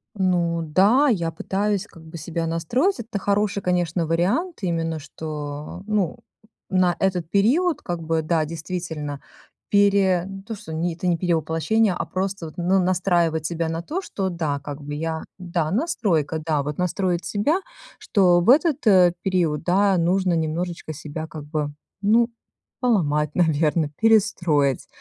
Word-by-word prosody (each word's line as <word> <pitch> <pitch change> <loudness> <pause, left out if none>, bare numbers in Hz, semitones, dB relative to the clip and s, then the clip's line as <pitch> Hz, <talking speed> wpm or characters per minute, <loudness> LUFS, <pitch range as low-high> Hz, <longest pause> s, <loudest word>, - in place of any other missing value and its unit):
Ну 175 -3 +1
да, 200 - +4
я 170 -7 0
пытаюсь 195 +4 -1
как 165 - -16
бы 160 +1 -9
себя 165 +2 -3
настроить. 230 - 0
Это 225 -2 -4
хороший, 200 0 0
конечно, 175 -2 0
вариант, 190 - 0
именно 165 -3 -1
что, 150 +2 -7
ну, 205 -6 0 0.5
на 185 -2 +2
этот 180 -4 0
период 285 - +2
как 175 -2 -4
бы, 160 0 0
да, 155 0 +1
действительно 160 -3 -5 0.5
пере 200 -3 +3
не 195 0 -8
то, 225 +1 -6
что, 195 -6 -9
не, 165 +2 -1
это 175 +2 -4
не 170 -1 +2
перевоплощение, 170 +5 +1
а - - -2
просто 190 -1 -3
вот, 155 - -10
ну, 185 +2 +2
настраивать 175 -3 +1
себя 165 -1 -2
на 165 +1 -3
то, 335 - -4
что, 190 - -3
да, 155 -5 -2
как 145 +1 -8
бы 145 +1 -6
я, 160 +1 -3 0.2
да, 170 -3 -2
настройка, 200 - 0
да, 155 -3 +1
вот 145 +1 -4
настроить 180 -1 -1
себя, 290 - +1 0.4
что 180 -3 +3
в 175 +7 +1
этот 305 0 +3 0.4
период, 175 -5 0
да, 190 +2 +3
нужно 180 +2 +2
немножечко 165 0 -2
себя 155 +2 -6
как 155 -1 -9
бы, 150 -1 -3 0.3
ну, 230 +3 +4 0.5
поломать, 150 - +1
наверно, 160 -2 +2
перестроить. 175 - +2
175 Hz, 150 wpm, -23 LUFS, 160-195 Hz, 0.5 s, да